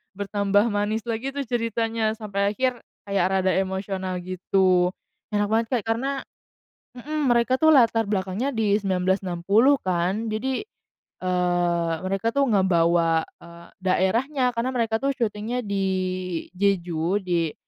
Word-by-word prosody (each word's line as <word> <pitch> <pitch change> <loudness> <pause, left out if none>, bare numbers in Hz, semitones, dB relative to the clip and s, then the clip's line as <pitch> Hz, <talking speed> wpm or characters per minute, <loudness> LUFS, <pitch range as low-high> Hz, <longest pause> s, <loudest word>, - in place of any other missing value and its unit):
bertambah 205 +2 +1
manis 205 +2 -1
lagi 235 +3 -3
tuh 280 - -1
ceritanya. 225 -2 -1
Sampai 200 -2 -2
akhir 255 -1 0 0.2
kayak 200 -3 0
rada 190 0 +1
emosional, 190 -1 -2
gitu. 185 0 +2 0.4
Enak 205 -1 0
banget, 225 0 +2
Kak, 230 - -1
karena 270 +4 -2 0.7
mhm, 295 +2 -2
mereka 240 +2 +3
tuh 315 - +5
latar 230 -6 +4
belakangnya 200 +5 -1
di 215 -4 +1
1960 190 +6 +2
kan, 185 +5 -1
jadi, 255 - -2 0.6
eee, 175 -2 +1
mereka 195 +4 -1
tuh, 280 - +3
ngebawa, 170 -4 +3 0.2
eee, 170 0 -13 0.2
daerahnya 245 +9 +1
karena 235 +2 -1
mereka 225 -2 +1
tuh 275 0 +1
syutingnya 230 0 -2
di 200 -1 -1 0.7
Jeju, 180 -1 0
di 170 -4 0
205 Hz, 125 wpm, -24 LUFS, 185-230 Hz, 0.7 s, tuh